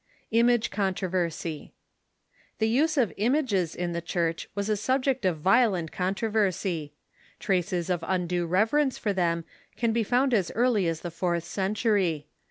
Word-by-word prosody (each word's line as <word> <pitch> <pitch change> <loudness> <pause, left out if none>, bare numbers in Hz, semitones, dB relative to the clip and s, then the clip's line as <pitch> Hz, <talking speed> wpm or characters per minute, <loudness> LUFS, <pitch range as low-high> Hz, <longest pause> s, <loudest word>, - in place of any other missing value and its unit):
The 190 -8 0 1.0
use 300 +8 +2
of 230 - +2
images 215 - +1
in 175 0 -2
the 170 0 -3
church 165 -1 -2
was 200 0 -2
a 215 - +2
subject 260 +2 0
of 180 -3 +1
violent 190 -1 +2
con 185 +1 -1
troversy. 190 -8 -1 0.5
Traces 180 -2 0
of 175 -3 -1
undue 180 -2 0
reverence 225 - +2
for 205 - -1
them 170 -3 0 0.3
can 230 -2 +1
be 230 - +2
found 250 +4 +2
as 195 -6 +2
eai'ly 230 -6 +2
as 165 -1 -2
the 175 - -5
fourth 170 0 -1
century. 190 - 0
190 Hz, 140 wpm, -27 LUFS, 170-230 Hz, 1.0 s, use